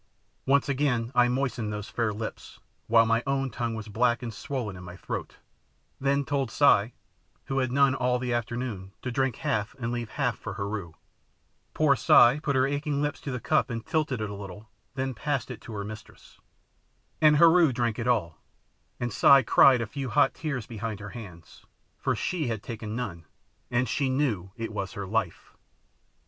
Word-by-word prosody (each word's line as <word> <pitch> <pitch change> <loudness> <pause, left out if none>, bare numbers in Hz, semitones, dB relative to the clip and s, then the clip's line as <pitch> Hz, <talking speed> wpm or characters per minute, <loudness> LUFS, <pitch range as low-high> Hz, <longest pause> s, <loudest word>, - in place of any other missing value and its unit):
Once 140 +1 +3
again 130 -4 0
I 125 -1 +5
moistened 125 -4 -1
those 105 -1 -5
fair 115 -2 -1
lips, 110 +1 -7 0.3
while 115 0 +5
my 115 +1 +2
own 135 -1 0
tongue 115 0 -3
was 110 -1 -6
black 120 +3 +1
and 115 -2 -5
swollen 120 -5 -4
in 90 - -10
my 90 0 -9
throat, - - -6 0.6
then 140 +1 +1
told 135 -3 -1
Si, 120 -4 +3 0.5
who 135 0 -1
had 130 - +2
had - - -8
none 140 0 +4
all 125 -2 +1
the 125 -1 -2
afternoon, 120 -5 -4
to 130 - -3
drink 130 -1 0
half 105 +2 -2
and 120 -3 -3
leave 120 -2 -3
half 125 -3 -1
for 110 - -6
Heru. 100 -4 -4 0.8
Poor 150 -3 +4
Si 120 +3 +6
put 140 -2 -1
her 130 0 +4
aching 145 +1 -1
lips 150 +1 -2
to - - -6
the 125 -2 -3
cup 155 +4 +1
and 115 -1 -5
tilted 155 -7 -1
it 105 - -2
a - - -5
little, 100 +2 -9 0.2
then 130 0 -2
passed 135 +4 -2
it 125 - -8
to 115 - -9
her 100 -1 -4
mistress. 105 0 -11 0.8
And 155 -1 +6
Heru 165 -1 +6
drank 120 -2 -1
it 115 - -2
all, 105 -10 0 0.6
and 120 -3 -3
Si 135 +4 +6
cried 125 +1 +6
a - - -1
few 135 +3 -5
hot 145 +5 +3
tears 140 -8 -4
behind 110 -2 -5
her 100 0 -7
hands, 90 -8 -11 0.4
FOR - - 0
SHE 165 -6 -2
HAD 110 -3 -3
TAKEN 110 -2 -6
NONE, 95 -9 -5 0.4
and 125 +1 +1
she 135 +4 0
knew 125 -9 0
it 115 -1 -5
was 100 +1 -4
her 100 -3 -5
life! 105 -3 -3
120 Hz, 190 wpm, -27 LUFS, 110-135 Hz, 0.8 s, Si